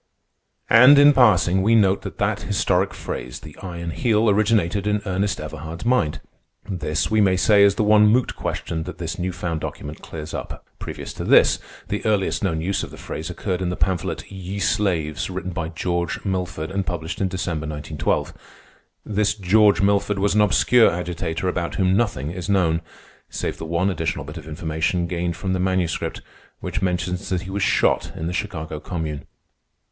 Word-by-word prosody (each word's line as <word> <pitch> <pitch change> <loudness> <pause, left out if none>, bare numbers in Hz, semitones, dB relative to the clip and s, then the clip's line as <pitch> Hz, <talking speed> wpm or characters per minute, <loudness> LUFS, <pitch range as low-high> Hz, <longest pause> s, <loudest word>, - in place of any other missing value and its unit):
And 125 +5 +8
in 145 +1 +8
passing 95 -7 +4
we 110 +4 +4
note 100 -3 +3
that - - -8
that - - 0
historic - - +1
phrase, 60 0 -6
the 75 -1 -11
Iron 85 -3 -5
Heel, 110 - +2
originated 105 -2 +1
in 105 0 0
Ernest 95 +1 -1
Everhard's 80 +4 -7
mind. 85 -12 +1 0.5
This, 90 -2 -2
we 110 0 +4
may 95 -2 +3
say, 100 +2 +5
is 100 0 +5
the - - +1
one 105 0 +6
moot 120 +4 +2
question 80 - -3
that - - -7
this 85 0 -5
new 90 +1 -1
found 85 -3 -3
document 75 +2 -6
clears 80 -1 -8
up. - - -6
Previous - - -7
to - - -6
this, - - +5 0.3
the 105 - -2
earliest 105 -3 0
known 80 -5 0
use 95 +4 -1
of - - -6
the - - -12
phrase 80 +2 -6
occurred 90 0 -3
in 90 - -1
the 90 - -2
pamphlet, 95 -3 -1
"Ye 95 +1 -6
Slaves," 85 -7 0
written 95 0 -4
by 85 -2 -3
George 85 +3 -2
Milford 90 -4 -3
and 100 0 -1
published 85 -1 -4
in 95 - +2
December, 85 -4 -3
1912. 75 0 -2 0.7
This 105 -1 +1
George 105 +1 +4
Milford 100 0 +2
was 100 +1 +1
an 105 - +4
obscure 115 +3 +5
agitator 90 0 -3
about 85 -2 -2
whom 95 -1 +2
nothing 90 - 0
is 90 +2 -6
known, 85 -5 +2 0.5
save - - -4
the 80 - -5
one 85 +4 +1
additional 75 -5 -2
bit 75 +3 -8
of 80 -1 -9
information 80 +3 -1
gained 85 0 -2
from 95 +2 -2
the 95 - -1
Manuscript, 95 -2 -1 0.4
which - - -4
mentions 90 0 -2
that 90 -2 0
he 95 - -7
was 100 +1 -2
shot - - +2
in 80 - -5
the 85 - -2
Chicago 80 -7 -4
Commune. 80 -3 -5
90 Hz, 185 wpm, -22 LUFS, 80-100 Hz, 0.7 s, And